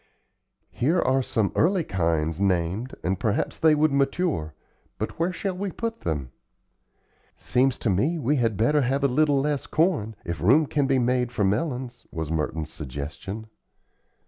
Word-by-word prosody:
"Here 160 Hz, +9 st, +1 dB
are 135 Hz, -3 st, +2 dB
some 110 Hz, -5 st, 0 dB
early 180 Hz, +1 st, +3 dB
kinds 80 Hz, -, 0 dB
named 95 Hz, +5 st, 0 dB
and 95 Hz, +1 st, -1 dB
perhaps 105 Hz, -3 st, -1 dB
they 160 Hz, -1 st, +5 dB
would 155 Hz, 0 st, +3 dB
mature; 140 Hz, -, 0 dB, 0.4 s
but -, -, -5 dB
where 170 Hz, +2 st, +1 dB
shall 190 Hz, 0 st, -3 dB
we 195 Hz, +2 st, -3 dB
put 230 Hz, +4 st, -4 dB
them?" 70 Hz, -6 st, -3 dB, 1.0 s
"Seems 130 Hz, +1 st, +1 dB
to 115 Hz, -, -1 dB
me 140 Hz, -, +1 dB
we 145 Hz, 0 st, +1 dB
had 115 Hz, -5 st, +1 dB
better 145 Hz, +7 st, +3 dB
have 135 Hz, +2 st, 0 dB
a -, -, +5 dB
little 145 Hz, +2 st, +3 dB
less 145 Hz, 0 st, -1 dB
corn, 155 Hz, -, +1 dB
if 85 Hz, -3 st, -4 dB
room 135 Hz, -, +5 dB
can 145 Hz, -1 st, 0 dB
be 135 Hz, -1 st, +3 dB
made 125 Hz, 0 st, +1 dB
for 110 Hz, -, -1 dB
melons," 120 Hz, +3 st, -2 dB
was 80 Hz, -2 st, -4 dB
Merton's 80 Hz, 0 st, -2 dB
suggestion. 80 Hz, -, -6 dB
125 Hz, 160 wpm, -25 LUFS, 90-150 Hz, 1.0 s, they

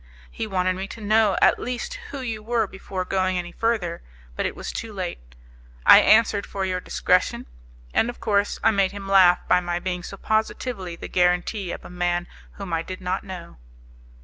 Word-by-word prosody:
He 225 Hz, -, -4 dB
wanted 185 Hz, -2 st, 0 dB
me 190 Hz, +1 st, -4 dB
to 225 Hz, -, -10 dB
know 215 Hz, -1 st, +3 dB
at -, -, +5 dB
least 250 Hz, -, -4 dB
who 275 Hz, -, -6 dB
you 225 Hz, -4 st, -4 dB
were 230 Hz, 0 st, 0 dB
before 190 Hz, -1 st, -5 dB
going 185 Hz, -1 st, 0 dB
any 175 Hz, -1 st, -4 dB
further, 210 Hz, -7 st, -1 dB, 0.3 s
but -, -, 0 dB
it -, -, -6 dB
was -, -, -5 dB
too 225 Hz, -, -5 dB
late. 175 Hz, -, -6 dB, 0.5 s
I -, -, +10 dB
answered 215 Hz, -2 st, +4 dB
for 195 Hz, -1 st, -3 dB
your 185 Hz, -1 st, -1 dB
discretion, -, -, +1 dB, 0.5 s
and 230 Hz, -, +2 dB
of 240 Hz, -, -8 dB
course 205 Hz, -1 st, +1 dB
I -, -, +5 dB
made 195 Hz, -2 st, +1 dB
him 200 Hz, -1 st, -7 dB
laugh 185 Hz, -2 st, +5 dB
by -, -, +5 dB
my 175 Hz, -1 st, -2 dB
being 180 Hz, 0 st, -3 dB
so 195 Hz, +2 st, -8 dB
positively 220 Hz, -3 st, -2 dB
the -, -, -8 dB
guarantee 180 Hz, +2 st, +1 dB
of -, -, -7 dB
a -, -, -9 dB
man 175 Hz, 0 st, -1 dB, 0.3 s
whom 195 Hz, -4 st, -7 dB
I 165 Hz, -, +1 dB
did 185 Hz, +2 st, -7 dB
not 185 Hz, 0 st, -2 dB
know." 185 Hz, -, -9 dB
190 Hz, 195 wpm, -24 LUFS, 180-215 Hz, 0.5 s, I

